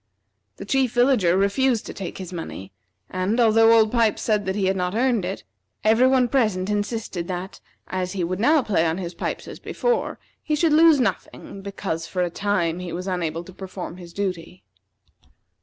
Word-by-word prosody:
The -, -, -8 dB
Chief 265 Hz, -4 st, +1 dB
Villager 245 Hz, -8 st, +3 dB
refused 225 Hz, +4 st, +1 dB
to -, -, -7 dB
take 190 Hz, -3 st, -6 dB
his 185 Hz, -1 st, -7 dB
money, 130 Hz, -, -7 dB, 0.4 s
and, 185 Hz, +6 st, -1 dB
although 225 Hz, -1 st, +5 dB
Old 220 Hz, -1 st, +4 dB
Pipes 230 Hz, -3 st, +1 dB
said 210 Hz, -3 st, 0 dB
that 190 Hz, -, -1 dB
he 200 Hz, -2 st, 0 dB
had 190 Hz, +1 st, +1 dB
not 180 Hz, +1 st, -2 dB
earned 235 Hz, -5 st, +1 dB
it, 185 Hz, -, -5 dB, 0.4 s
every 225 Hz, +4 st, +5 dB
one 260 Hz, -1 st, +3 dB
present 215 Hz, -7 st, +1 dB
insisted 205 Hz, -4 st, -3 dB
that, 185 Hz, +1 st, -6 dB, 0.2 s
as 185 Hz, 0 st, -3 dB
he 190 Hz, -3 st, -2 dB
would 180 Hz, +2 st, -2 dB
now 290 Hz, +5 st, +4 dB
play 190 Hz, -8 st, +1 dB
on 160 Hz, +1 st, -1 dB
his 180 Hz, -2 st, -5 dB
pipes -, -, -4 dB
as -, -, -9 dB
before, 485 Hz, -1 st, -1 dB, 0.2 s
he 305 Hz, -, -1 dB
should 310 Hz, 0 st, +2 dB
lose 320 Hz, -1 st, +6 dB
nothing, 215 Hz, -4 st, -3 dB
because, 195 Hz, -4 st, -4 dB
for 180 Hz, -1 st, -1 dB
a 175 Hz, -, -2 dB
time, 180 Hz, -4 st, 0 dB
he 180 Hz, -1 st, -6 dB
was 180 Hz, +2 st, -5 dB
unable 170 Hz, -3 st, -2 dB
to 185 Hz, -, -13 dB
perform 185 Hz, -2 st, -7 dB
his 175 Hz, -2 st, -11 dB
duty. 180 Hz, -2 st, -4 dB
195 Hz, 190 wpm, -23 LUFS, 180-230 Hz, 0.4 s, lose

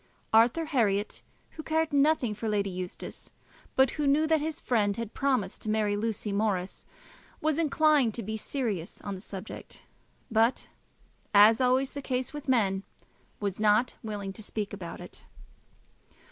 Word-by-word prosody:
Arthur 235 Hz, +9 st, +5 dB
Herriot, 215 Hz, -9 st, 0 dB, 0.3 s
who 315 Hz, -, -8 dB
cared 320 Hz, 0 st, 0 dB
nothing 285 Hz, -5 st, +3 dB
for 220 Hz, +1 st, -4 dB
Lady 200 Hz, -2 st, 0 dB
Eustace, 180 Hz, 0 st, -7 dB, 0.5 s
but 265 Hz, -1 st, +4 dB
who 295 Hz, -2 st, -1 dB
knew 295 Hz, +3 st, +4 dB
that 315 Hz, -1 st, +2 dB
his 315 Hz, 0 st, -3 dB
friend 205 Hz, -5 st, +1 dB
had 230 Hz, -2 st, -5 dB
promised 270 Hz, -2 st, 0 dB
to 215 Hz, -, -4 dB
marry 215 Hz, -1 st, +1 dB
Lucy 215 Hz, -1 st, -2 dB
Morris, 200 Hz, -3 st, -1 dB, 0.5 s
was 310 Hz, 0 st, 0 dB
inclined 305 Hz, -6 st, +3 dB
to 235 Hz, -, -3 dB
be 220 Hz, +2 st, -4 dB
serious 215 Hz, -, -3 dB
on 200 Hz, -, -5 dB
the 185 Hz, -, -7 dB
subject; 195 Hz, 0 st, -8 dB, 0.5 s
but, 225 Hz, +3 st, +2 dB, 0.7 s
as 210 Hz, +2 st, +8 dB
is -, -, -3 dB
always 255 Hz, +2 st, +2 dB
the 285 Hz, -, -6 dB
case 255 Hz, +1 st, -2 dB
with 295 Hz, -2 st, -7 dB
men, 195 Hz, -6 st, +2 dB, 0.6 s
was 200 Hz, -2 st, -3 dB
not 215 Hz, +3 st, +3 dB
willing 205 Hz, -3 st, -5 dB
to 220 Hz, -, -8 dB
speak 210 Hz, -1 st, -4 dB
about 180 Hz, -4 st, -7 dB
it. -, -, -10 dB
225 Hz, 160 wpm, -29 LUFS, 205-275 Hz, 0.7 s, as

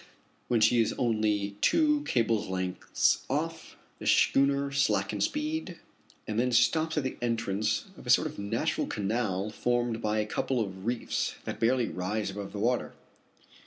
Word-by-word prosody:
When 120 Hz, -2 st, +2 dB
she 115 Hz, +2 st, +5 dB
is 110 Hz, -, 0 dB
only 105 Hz, -4 st, 0 dB
two 300 Hz, -2 st, +3 dB
cable's 115 Hz, -3 st, +1 dB
lengths 95 Hz, -1 st, 0 dB
off, -, -, -3 dB, 0.2 s
the -, -, -5 dB
schooner 140 Hz, 0 st, +3 dB
slackens 105 Hz, -7 st, +1 dB
speed, 300 Hz, -, -3 dB, 0.5 s
and 110 Hz, +1 st, -1 dB
then 125 Hz, +1 st, +1 dB
stops 160 Hz, +7 st, +2 dB
at 150 Hz, -, +1 dB
the 130 Hz, -, -4 dB
entrance 110 Hz, -4 st, -1 dB
of -, -, -13 dB
a -, -, -5 dB
sort -, -, +5 dB
of -, -, -5 dB
natural 100 Hz, 0 st, -1 dB
canal 105 Hz, -1 st, -1 dB
formed 120 Hz, 0 st, -1 dB
by 105 Hz, -1 st, 0 dB
a 105 Hz, -, +1 dB
couple 125 Hz, +4 st, -1 dB
of 95 Hz, -2 st, -4 dB
reefs 120 Hz, -1 st, -1 dB
that -, -, -5 dB
barely 120 Hz, +1 st, +2 dB
rise 100 Hz, +3 st, -2 dB
above 100 Hz, 0 st, -6 dB
the -, -, -7 dB
water. 120 Hz, +4 st, 0 dB
115 Hz, 160 wpm, -29 LUFS, 105-125 Hz, 0.5 s, she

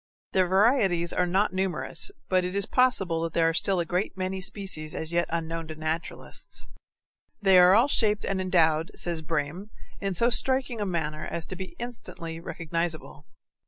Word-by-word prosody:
Their 185 Hz, -1 st, +2 dB
varieties 190 Hz, -4 st, +3 dB
are 180 Hz, -, +1 dB
not 190 Hz, +3 st, +1 dB
numerous, 190 Hz, -, 0 dB, 0.2 s
but 185 Hz, -1 st, +2 dB
it 180 Hz, +1 st, -3 dB
is 200 Hz, -1 st, +2 dB
possible 195 Hz, -10 st, +1 dB
that 165 Hz, 0 st, -3 dB
there 165 Hz, -1 st, +3 dB
are 165 Hz, -, +1 dB
still 190 Hz, +2 st, +2 dB
a 170 Hz, -, 0 dB
great 180 Hz, +4 st, -2 dB
many 190 Hz, 0 st, -3 dB
species 180 Hz, -6 st, -2 dB
as 160 Hz, +1 st, -3 dB
yet 170 Hz, 0 st, +1 dB
unknown 165 Hz, 0 st, -3 dB
to 155 Hz, -, -7 dB
naturalists. 160 Hz, +2 st, -5 dB, 0.7 s
They 195 Hz, -3 st, +6 dB
are 180 Hz, +2 st, +7 dB
all 235 Hz, +5 st, +5 dB
shaped 215 Hz, -6 st, +2 dB
and 195 Hz, -1 st, -1 dB
endowed, 165 Hz, -3 st, +2 dB
says 170 Hz, -2 st, -1 dB
Brehm, 160 Hz, +5 st, -3 dB, 0.3 s
in 195 Hz, -2 st, -2 dB
so 235 Hz, +6 st, +3 dB
striking 260 Hz, -2 st, +2 dB
a 205 Hz, -, -1 dB
manner 155 Hz, -4 st, -3 dB
as 165 Hz, -1 st, -2 dB
to 185 Hz, -, -5 dB
be 190 Hz, -, -8 dB
instantly 170 Hz, -9 st, -7 dB
recognizable. 165 Hz, -2 st, -4 dB
180 Hz, 175 wpm, -27 LUFS, 165-195 Hz, 0.7 s, are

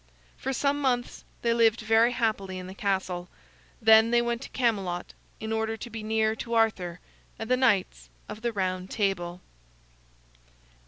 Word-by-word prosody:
For 270 Hz, -, -3 dB
some 280 Hz, +2 st, 0 dB
months 245 Hz, -3 st, -1 dB, 0.2 s
they 235 Hz, -1 st, +3 dB
lived 230 Hz, -1 st, +3 dB
very 225 Hz, +2 st, +4 dB
happily 210 Hz, -6 st, -1 dB
in 185 Hz, -, -6 dB
the 185 Hz, -, -8 dB
castle. 190 Hz, -4 st, -2 dB, 0.5 s
Then 220 Hz, -1 st, +6 dB
they 240 Hz, 0 st, +4 dB
went 235 Hz, 0 st, -1 dB
to -, -, -8 dB
Camelot 195 Hz, -8 st, -1 dB, 0.3 s
in 220 Hz, 0 st, -3 dB
order 220 Hz, 0 st, -1 dB
to 240 Hz, -, -8 dB
be 225 Hz, 0 st, -5 dB
near 220 Hz, 0 st, +1 dB
to 235 Hz, +1 st, -3 dB
Arthur 185 Hz, -6 st, +1 dB, 0.4 s
and 225 Hz, +2 st, -5 dB
the -, -, +6 dB
Knights 230 Hz, -8 st, +1 dB, 0.2 s
of 210 Hz, +1 st, -8 dB
the 235 Hz, 0 st, -1 dB
Round 185 Hz, -2 st, -2 dB
Table. 180 Hz, -4 st, -1 dB
220 Hz, 160 wpm, -27 LUFS, 190-235 Hz, 0.5 s, Then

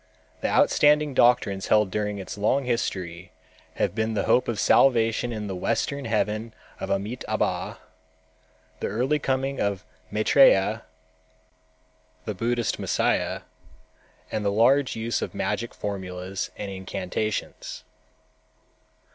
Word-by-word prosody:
The -, -, -1 dB
outstanding 150 Hz, -1 st, +4 dB
doctrines 120 Hz, -6 st, +3 dB
held 105 Hz, -3 st, +3 dB
during 105 Hz, 0 st, -2 dB
its 95 Hz, -, -6 dB
long 115 Hz, +7 st, +1 dB
history 90 Hz, -7 st, -3 dB, 0.4 s
have -, -, 0 dB
been 110 Hz, 0 st, -1 dB
the 100 Hz, -, +1 dB
hope 125 Hz, -, +3 dB
of 115 Hz, -3 st, -2 dB
salvation 115 Hz, -1 st, +3 dB
in 110 Hz, -2 st, -4 dB
the 95 Hz, -2 st, -4 dB
Western 125 Hz, +8 st, -1 dB
Heaven 110 Hz, 0 st, -1 dB, 0.2 s
of -, -, -5 dB
Amitâbha, 105 Hz, +6 st, -2 dB, 1.0 s
the -, -, -2 dB
early 130 Hz, +8 st, 0 dB
coming 135 Hz, 0 st, -1 dB
of 100 Hz, -2 st, -1 dB, 0.3 s
Maitrêya, 110 Hz, -2 st, +4 dB, 1.4 s
the 105 Hz, -, -2 dB
Buddhist 120 Hz, +3 st, -1 dB
Messiah, -, -, 0 dB, 0.9 s
and 110 Hz, -, -2 dB
the 100 Hz, -, +1 dB
large 125 Hz, +6 st, +3 dB
use 115 Hz, 0 st, -2 dB
of -, -, -4 dB
magic 120 Hz, +1 st, -2 dB
formulas 95 Hz, -1 st, -5 dB
and 100 Hz, -1 st, -5 dB
incantations. 95 Hz, +2 st, -4 dB
110 Hz, 115 wpm, -25 LUFS, 100-120 Hz, 1.4 s, outstanding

